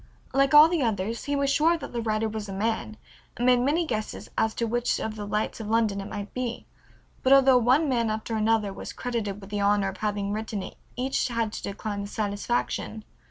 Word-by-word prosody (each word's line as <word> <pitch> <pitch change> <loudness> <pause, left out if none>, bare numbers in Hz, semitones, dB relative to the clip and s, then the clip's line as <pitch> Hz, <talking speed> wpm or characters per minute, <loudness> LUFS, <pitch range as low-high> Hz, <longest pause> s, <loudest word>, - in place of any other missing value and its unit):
Like 275 +1 +3
all 300 +1 +10
the 335 -2 0
others 225 -1 -1
he 285 - 0
was 280 0 +1
sure 320 +4 +3
that - - -8
the 235 - -1
writer 220 0 0
was 215 -1 -5
a - - -5
man, 220 +1 -2 0.4
and 245 - -1
made 250 -1 +5
many 295 +7 +1
guesses 215 -7 -4
as 220 0 +1
to 235 - 0
which 240 +2 0
of 220 -1 -3
the 205 -1 -6
lights 210 +3 -2
of 220 - -5
London 220 -3 +1
it 195 - -7
might 205 0 -6
be, 250 -2 -4 0.6
but 260 - +2
although 270 -2 +7
one 260 +7 +3
man 235 -4 +1
after 220 +1 -3
another 215 -2 +1
was - - -7
credited 225 -5 -3
with 195 0 -12
the 205 -1 -1
honor 200 -1 +3
of 195 - -8
having 205 -1 -2
written 215 -2 -3
it - - -9 0.2
each 260 +2 0
had 230 -3 -1
to - - -5
decline 205 +1 -4
the 200 - -5
satisfaction. 215 +1 -2
220 Hz, 220 wpm, -26 LUFS, 210-250 Hz, 0.6 s, all